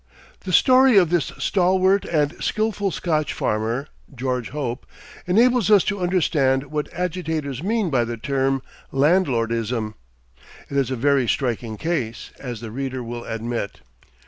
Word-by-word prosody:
The 185 - -6
story 255 +4 +6
of 175 -4 +5
this 170 -6 +2
stalwart 190 +1 +2
and 150 -3 +1
skillful 215 -2 0
Scotch 155 -5 -1
farmer, 115 +5 -1 0.3
George 125 -1 -2
Hope, 130 -3 -4 0.4
enables 235 +2 +4
us 205 -3 +6
to 205 -1 -2
understand 145 -7 +1
what 150 -1 -3
agitators 160 -6 -3
mean 205 -1 0
by 120 -3 +2
the 115 0 -5
term 135 +2 0 0.3
"landlordism." 115 - +1 0.8
It 140 - -1
is 135 -3 +1
a 130 - -1
very 135 0 +2
striking 115 -3 -1
case, 130 -8 -3
as 120 -4 -6
the 115 -2 -7
reader 130 +1 -4
will 120 0 -6
admit. 115 -2 -4
140 Hz, 140 wpm, -22 LUFS, 120-180 Hz, 0.8 s, story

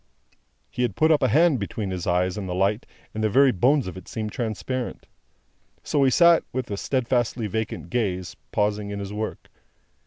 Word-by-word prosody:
He - - -3
had 120 -6 0
put 155 +7 +3
up 155 - +4
a 130 - +4
hand 155 -1 +4
between 100 0 -4
his 90 -2 -4
eyes 90 +1 +1
and 100 -3 -5
the 90 - -2
light, 100 +4 0 0.3
and 110 - -3
the 110 - +2
very 135 +4 +5
bones 130 +7 +2
of 90 - -6
it 95 - -11
seemed 110 -2 -4
transparent. 120 +1 -4 0.8
So 145 - +1
he 135 - +5
sat, 170 +5 +5
with 130 -4 -4
a 100 - -2
steadfastly 120 -1 0
vacant 110 +1 -4
gaze, 95 -7 -2 0.2
pausing 105 0 0
in 100 - -4
his 100 0 -5
work. 110 +1 -5
110 Hz, 190 wpm, -24 LUFS, 100-130 Hz, 0.8 s, very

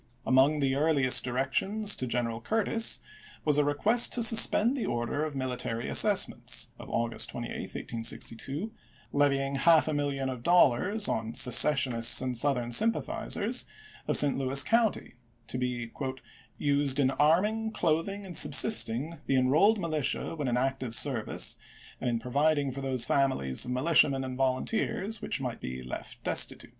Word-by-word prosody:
Among 135 +3 +2
the 135 -1 0
earliest 140 -3 +3
directions 190 - -1
to 130 - -2
General 115 -1 -3
Curtis 225 - -1 0.4
was 150 -1 +2
a - - +3
request 205 +12 +3
to 240 - 0
suspend 230 +2 +5
the 255 - -4
order 120 +5 -3
of 155 -2 -5
mili 130 -2 -4
tary 115 -1 -5
assessments - - +1
(of - - -11
August 115 0 -2
28, - - -7 0.5
1862), 135 - -4 0.4
levying 140 -1 0
half 160 +2 +3
a 155 - -2
million 140 -2 -3
of 130 -2 -6
dollars 180 - +2
on 110 +1 -4
"secessionists 125 -2 +4
and 130 -1 -4
Southern 125 -1 +2
sympathizers 225 - -1 0.2
" 430 - -21
of - - +4
St. 145 -2 +4
Louis 135 +1 +4
County, 230 -2 -1 0.3
to 125 - -5
be 120 -2 -4 0.4
" - - -23 0.2
used 140 -1 0
in 135 -1 +1
arming, 185 +11 0
clothing, 195 +4 -2
and 180 -3 -10
subsisting 145 - +4
the 135 - 0
Enrolled 155 +13 +2
Militia 155 -7 -3
when 150 -4 -4
in 125 0 -1
active 130 -2 -3
service, 125 -6 0 0.4
and 125 - -3
in 120 - -1
providing 140 +4 -1
for 135 +2 -7
those 130 -3 0
families 70 - -1
of - - -8
militiamen 135 0 +1
and 130 -1 -6
volunteers 185 - -2
which - - -3
might 125 -3 -6
be 65 0 -7
left 65 - -9
destitute." - - +1
140 Hz, 155 wpm, -27 LUFS, 125-165 Hz, 0.5 s, suspend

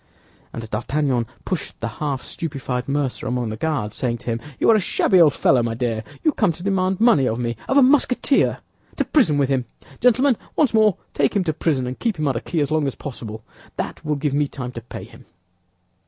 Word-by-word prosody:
And 115 -1 -6
D'Artagnan 125 +2 -1 0.2
pushed 180 -6 -4
the 115 - -2
half 135 +3 -3
stupefied 135 -5 -4
mercer 140 -2 -1
among 125 -2 -1
the 110 - -4
Guards, 115 -5 -2
saying 120 -3 -1
to - - -18
him, 115 +1 -3 0.2
"You - - +4
are - - +6
a - - +4
shabby 185 -1 +3
old 150 -4 +5
fellow, 125 - +4
my 115 -1 -1
dear. 115 -2 -2 0.2
You 315 - +4
come 210 -9 +2
to 175 - -11
demand 190 -1 +1
money 215 - +5
of 110 - -1
me—of 120 - -2
a 280 - +8
Musketeer! 270 0 +3 0.4
To - - 0
prison 225 - +3
with 140 -2 +2
him! 130 -3 +1 0.3
Gentlemen, 250 +1 +4 0.2
once 285 -7 +2
more, 215 -4 +4 0.2
take - - +1
him 200 - +2
to 160 -3 -1
prison, 145 -5 0
and 125 +1 -5
keep 230 -6 -1
him 155 -1 0
under 130 -4 0
key 165 +5 -2
as 145 - -1
long 155 -2 +2
as 135 - -3
possible; 110 -6 -7 0.3
that - - -5
will 150 -1 0
give 145 -1 -1
me 145 0 +2
time 125 -3 -6
to 115 - -7
pay 115 - -9
him." - - -15
145 Hz, 215 wpm, -22 LUFS, 125-185 Hz, 0.4 s, a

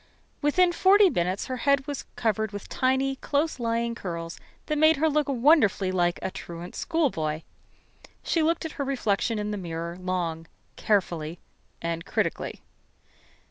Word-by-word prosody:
Within 350 +5 +4
forty 385 +2 +6
minutes 180 +3 -1
her 255 - -4
head 280 +1 +2
was 285 -2 -5
covered 220 -1 0
with 205 -1 -7
tiny 265 +1 +1
close 290 +1 -1
lying 235 0 0
curls 170 -5 -6 0.3
that 305 -1 -1
made 315 +1 +6
her 315 +3 +2
look 300 -1 +1
wonderfully 245 - +4
like 175 -1 +1
a - - -2
truant 170 0 -8
schoolboy. 165 - -1 0.8
She 330 - +1
looked 325 +1 +1
at 320 - -4
her - - +2
reflection 230 -4 0
in 210 0 -2
the 210 - -2
mirror, 170 0 -4
long, 175 -3 -2 0.3
carefully, 175 -6 0 0.5
and 165 0 -2
critically. - - -2
230 Hz, 145 wpm, -26 LUFS, 175-290 Hz, 0.8 s, forty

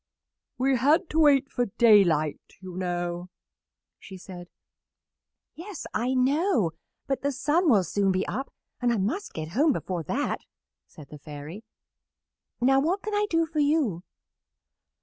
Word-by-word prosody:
"We 260 +1 +2
had 300 +8 +2
to 320 - +1
wait 285 -3 +4
for 245 -1 0
daylight, 190 -9 +3
you 185 -2 -9
know," 175 -1 -3 0.7
she 190 - -11
said. 180 -1 -10 1.1
"Yes, 360 +1 -8
I 250 +4 0
know; 270 - +2 0.3
but 270 -2 -2
the 285 - 0
sun 300 +5 +1
will 205 -7 +5
soon 195 +3 0
be 185 +1 -1
up, 270 +2 -4 0.3
and 245 -1 +2
I 235 - +1
must 230 - -2
get 155 -1 -5
home 280 - +2
before 180 -6 -3
that," 275 - -2 0.5
said 150 -3 -14
the 150 - -10
Fairy. 150 +7 -9 1.0
"Now 270 +2 +4
what 355 +8 0
can 430 - -4
I 415 0 +1
do 330 0 +2
for 315 -1 -4
you?" 285 - +1
245 Hz, 150 wpm, -26 LUFS, 180-295 Hz, 1.1 s, will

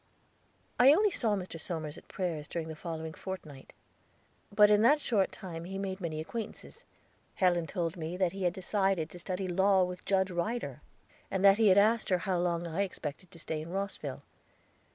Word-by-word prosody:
I 260 +4 +8
only 415 +5 +3
saw 220 -10 +1
Mr. 180 -4 -6
Somers 160 -3 -4
at - - -13
prayers 165 -5 -3
during 165 -2 -4
the 160 - -6
following 160 0 -5
fortnight. 160 -9 -8 0.8
But 210 0 +6
in 210 0 +5
that 280 +7 +5
short 210 -9 +1
time 170 -3 -7
he 190 +2 -5
made 195 -1 -4
many 160 -3 -3
acquaintances. 220 +8 -7 0.5
Helen 175 -3 +2
told 170 -3 -2
me 165 +2 -4
that 185 -2 +2
he 195 - -7
had 175 - +2
decided 190 -3 0
to 175 - -9
study 185 +1 -3
law 190 +1 +4
with 180 0 -4
Judge 190 -1 +1
Ryder, 200 +8 -3 0.5
and 190 0 0
that 195 +2 +7
he 220 - +5
had 190 0 +6
asked 220 +3 +4
her 185 - +3
how 180 0 -1
long 175 -1 0
I 170 +3 -2
expected 180 -3 -5
to 170 - -14
stay 160 -1 -4
in 160 - -8
Rosville. 195 +2 -4
185 Hz, 190 wpm, -31 LUFS, 170-200 Hz, 0.8 s, I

